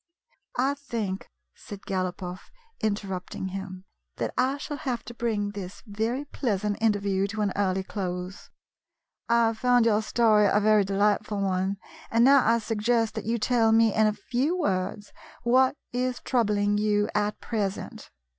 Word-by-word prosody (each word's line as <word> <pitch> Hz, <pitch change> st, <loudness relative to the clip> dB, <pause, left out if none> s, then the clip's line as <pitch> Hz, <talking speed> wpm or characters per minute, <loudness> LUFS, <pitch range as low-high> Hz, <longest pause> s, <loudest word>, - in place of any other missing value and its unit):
" -, -, -20 dB
I -, -, 0 dB
think," 230 Hz, -9 st, -4 dB, 0.2 s
said 200 Hz, -1 st, -10 dB
Galopoff, 185 Hz, -1 st, -4 dB, 0.3 s
interrupting 195 Hz, -3 st, -3 dB
him, 190 Hz, -1 st, -7 dB, 0.3 s
"that -, -, -2 dB
I 265 Hz, +2 st, +1 dB
shall 295 Hz, 0 st, -5 dB
have 250 Hz, -6 st, -3 dB
to 240 Hz, -, -8 dB
bring 215 Hz, -4 st, -1 dB
this 195 Hz, -2 st, -8 dB
very 225 Hz, +6 st, -2 dB
pleasant 210 Hz, -7 st, -2 dB
interview 200 Hz, -3 st, +1 dB
to 215 Hz, +1 st, -4 dB
an 205 Hz, -2 st, 0 dB
early 190 Hz, -1 st, 0 dB
close. 185 Hz, -1 st, -5 dB, 0.8 s
I 235 Hz, 0 st, +4 dB
have 225 Hz, -1 st, -1 dB
found 245 Hz, -2 st, +4 dB
your 215 Hz, -2 st, +3 dB
story 215 Hz, -2 st, +3 dB
a 210 Hz, -, +4 dB
very 215 Hz, 0 st, +4 dB
delightful 205 Hz, +1 st, +1 dB
one, 190 Hz, 0 st, 0 dB, 0.3 s
and 230 Hz, +1 st, +4 dB
now 275 Hz, 0 st, +6 dB
I 230 Hz, +1 st, +4 dB
suggest 225 Hz, 0 st, 0 dB
that -, -, -5 dB
you 230 Hz, +2 st, 0 dB
tell 230 Hz, 0 st, +2 dB
me 225 Hz, -1 st, +4 dB
in 215 Hz, 0 st, +4 dB
a 215 Hz, -, +1 dB
few 255 Hz, -, -1 dB
words 205 Hz, -, -2 dB, 0.3 s
what 255 Hz, +3 st, +4 dB, 0.2 s
is 250 Hz, 0 st, -1 dB
troubling 205 Hz, -4 st, +1 dB
you 210 Hz, 0 st, +2 dB
at 210 Hz, 0 st, 0 dB
present. 205 Hz, -4 st, -4 dB
210 Hz, 155 wpm, -26 LUFS, 200-235 Hz, 0.8 s, now